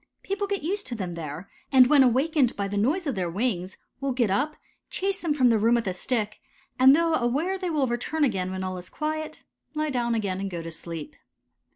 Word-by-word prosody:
People 400 +1 -2
get 400 -5 -2
used 395 +5 -2
to 245 - -4
them 185 -5 -4
there, 165 +2 -6 0.2
and 260 -2 +8
when 285 +2 +5
awakened 265 +1 +3
by 200 -1 -2
the 200 - -4
noise 285 - +1
of 280 - 0
their 185 -4 -2
wings 190 -2 -2 0.2
will 275 -1 -1
get 240 -6 +1
up, 290 +9 0 0.3
chase 390 +1 -1
them 335 - -1
from 260 -4 +4
the 225 -2 +3
room 230 +3 +4
with 235 -1 0
a 190 - -1
stick, 210 +2 -2 0.4
and 265 +2 +8
though 330 0 +2
aware 295 +8 +1
they 365 -2 -2
will 300 -4 +1
return 250 +6 -1
again 190 -9 +1
when 190 0 -4
all 185 -1 -3
is 180 - -9
quiet, 310 0 -4 0.3
lie 305 0 -1
down 240 -2 0
again 195 -4 -1
and 195 0 -3
go 170 -3 -5
to 165 - -6
sleep. 165 -1 -6
245 Hz, 225 wpm, -26 LUFS, 195-305 Hz, 0.4 s, and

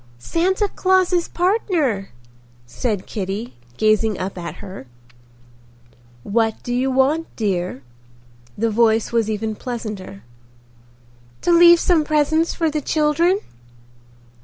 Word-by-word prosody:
"Santa 370 - 0
Claus's 370 -2 +1
partner," 345 - 0 0.6
said 200 - -3
Kitty, 205 +3 -5 0.2
gazing 215 -1 +2
up 190 +1 -4
at 170 -2 -6
her. 190 -10 -10 1.4
"What 225 - +1
do 245 - -3
you 255 +2 +1
want, 275 +5 +1
dear?" 180 - -2 0.7
The 225 +1 0
voice 225 0 +2
was 230 -2 +1
even 220 0 -2
pleasanter. 210 - -7 1.2
"To - - +1
leave 345 0 +7
some 335 -3 +2
presents 310 +2 +1
for 325 -2 -1
the 300 0 -2
children." 330 +7 +1
240 Hz, 110 wpm, -20 LUFS, 210-330 Hz, 1.4 s, leave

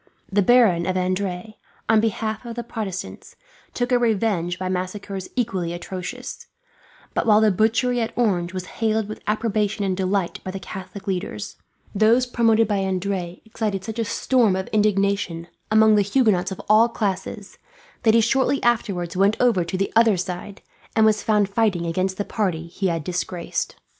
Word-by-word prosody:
The 205 +1 +3
Baron 200 -6 +4
of 185 - 0
Adrets, 185 +2 -2 0.3
on 220 0 +5
behalf 220 0 -2
of 235 -1 -7
the 240 - -4
Protestants, 210 -5 -6 0.4
took 245 +1 -1
revenge 215 -7 +1
by 185 -1 -3
massacres 185 +1 -4
equally 190 -9 -1
atrocious; 190 +8 -7 0.7
but - - -1
while 210 -1 +6
the 215 -1 +4
butchery 235 +5 +1
at 225 - -2
Orange 185 -7 +1
was 185 -1 -5 0.2
hailed 220 -1 +1
with 215 - -8
approbation 215 -1 0
and 190 -1 0
delight 190 -1 -1
by - - -5
the 195 +1 -5
Catholic 190 +1 -9
leaders, 180 - -4 0.4
those 225 +5 +4
promoted 225 -2 +3
by 205 -2 0
Adrets 185 -2 -2
excited 215 -3 -3
such 220 +2 -6
a - - +2
storm 230 -2 +2
of 190 0 -2
indignation, 200 -5 0 0.2
among 220 0 +5
the 210 - +5
Huguenots 200 -4 +2
of 190 - -6
all 220 +3 +5
classes, 200 -1 -4 0.4
that 225 -1 +4
he 230 - +6
shortly 265 +4 +2
afterwards 200 -7 0
went 195 +3 +3
over 230 -8 +3
to 170 +2 -4
the 195 - -2
other 225 -3 +5
side, 185 +2 -6 0.3
and 220 -1 +5
was 215 -1 +3
found 210 -2 +2
fighting 200 -4 0
against 185 +3 -1
the 205 - -2
party 180 -7 -2
he 190 +3 -3
had 165 -3 -1
disgraced. 175 +1 -3
200 Hz, 170 wpm, -23 LUFS, 185-220 Hz, 0.7 s, while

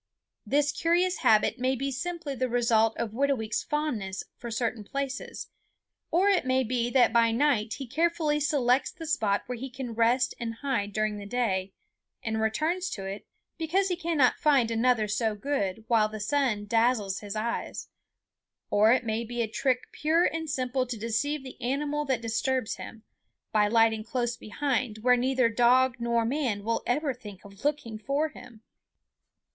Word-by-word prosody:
This 290 +1 +2
curious 350 +2 +1
habit 215 +3 +3
may 260 +1 +1
be 275 +2 -2
simply 325 +2 -4
the 255 -1 -1
result 230 -2 +2
of 230 -3 -2
Whitooweek's 240 -3 0
fondness 230 -11 -2
for 235 - -8
certain 230 -1 -2
places; 275 +4 -5 0.6
or 360 +4 +3
it 395 -3 +3
may 260 0 +2
be 240 0 -1
that 245 -2 +4
by 230 -1 +5
night 230 -3 +1
he 275 - -6
carefully 315 +2 +1
selects 270 -3 +2
the 325 - -9
spot 220 -11 +1
where 250 -1 -5
he 265 +2 -5
can 255 -2 -6
rest 235 +3 +2
and 230 -1 -4
hide 230 -6 -2
during 215 0 -1
the 200 - -8
day, 195 -5 -1 0.5
and 220 -1 -1
returns 320 +12 0
to 195 - -6
it 195 +2 -6 0.3
because 375 +5 +1
he 360 - 0
cannot 330 -7 +2
find 270 -6 +3
another 230 -1 +2
so 220 +1 0
good 220 -4 -2
while 220 -2 +3
the 215 0 -7
sun 225 -2 0
dazzles 225 -3 +1
his 205 0 -7
eyes; 225 +2 -3 0.8
or 215 +2 +5
it 250 0 +2
may 220 +1 -1
be 235 +1 -2
a - - -2
trick 255 +3 -1
pure 320 +3 +2
and 320 0 -2
simple 255 -2 -1
to 240 -1 -4
deceive 230 +7 -1
the 260 - -11
animal 295 +4 -1
that 260 -4 0
disturbs 240 +2 -1
him, 225 -1 -9 0.5
by 210 -1 +3
lighting 225 0 +3
close 240 +1 -2
behind 245 -1 -2
where 250 0 +6
neither 255 0 +2
dog 245 +2 +3
nor 235 -1 +1
man 240 -6 -1
will 230 +2 0
ever 280 +2 +1
think 210 -5 -12
of 200 +2 -14
looking 285 -7 -2
for 280 +7 0
him. 240 -7 -14
245 Hz, 170 wpm, -28 LUFS, 220-280 Hz, 0.8 s, where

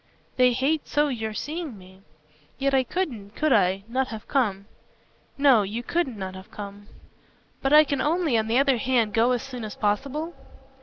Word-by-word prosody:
They 250 -1 +4
hate 280 +5 0
so 295 0 +2
your 220 -4 -4
seeing 305 -4 -5
me. 185 0 -16 0.6
Yet 275 0 0
I 265 - +5
couldn't 240 - -4
could 310 -3 +2
I? 190 +2 +2
not 255 +3 0
have 220 -3 -8
come." 205 -8 0 0.7
"No, 275 -6 +5
you 210 +4 -4
couldn't 275 -6 -1
not 190 -1 -5
have 190 0 -11
come." 205 0 -9 0.7
"But 270 - 0
I 305 +1 +9
can 280 -3 -2
only, 315 -2 +1
on 220 -1 +1
the 230 +2 +2
other 275 -1 +3
hand, 230 -3 +1
go 230 +2 +3
as 245 -2 0
soon 255 -3 -7
as 215 - -6
possible?" 275 +10 -1
250 Hz, 185 wpm, -25 LUFS, 210-280 Hz, 0.7 s, I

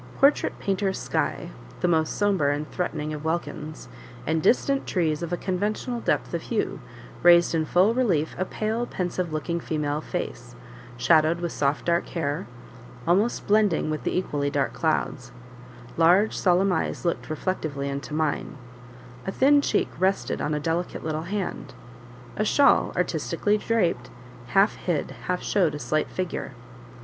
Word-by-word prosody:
A - - -16
portrait 280 +1 +3
painter's 195 -1 -1
sky - - -2 0.3
(the - - +2
most 160 -2 +1
sombre 195 -9 +2
and 150 +1 -4
threatening 155 -4 -3
of 150 0 -6
welkins), 155 -1 -4 0.4
and 160 +2 +1
distant 275 - +2
trees 160 -5 0
of 170 0 -4
a 175 - 0
conventional 210 +7 -2
depth - - -1
of - - -1
hue, - - -2 0.4
raised 175 0 +6
in 160 -1 +1
full 185 +7 +3
relief 185 -12 +1
a 185 - +1
pale, 220 +5 -2
pensive 180 -1 -3
looking 170 +2 -2
female 150 -2 -2
face, 120 -5 -5 0.4
shadowed 160 +5 +4
with 170 -1 -3
soft 140 0 0
dark 170 0 +1
hair, 145 -8 -3 0.6
almost 200 +7 +2
blending 205 -7 +2
with 155 - -3
the - - -1
equally 145 -6 -1
dark 140 -1 0
clouds; 155 -5 -1 0.7
large, 180 +6 +4
solemn 185 +1 +3
eyes 160 - -2
looked 170 - -1
reflectively 155 -4 -2
into 140 +2 -4
mine; 155 -1 -1 0.7
a - - 0
thin 285 +6 +5
cheek - - +1
rested 190 +2 0
on 150 0 0
a - - -1
delicate 165 +3 -2
little 160 +2 -3
hand; 200 -2 -4 0.6
a 215 - 0
shawl, 280 +6 +4
artistically 205 0 0
draped, 175 - 0 0.4
half 195 - +3
hid, 165 -6 -2 0.2
half 180 0 -1
showed 175 -7 +1
a - - -3
slight 150 +3 -1
figure. 180 -6 -4
170 Hz, 155 wpm, -25 LUFS, 155-195 Hz, 0.7 s, raised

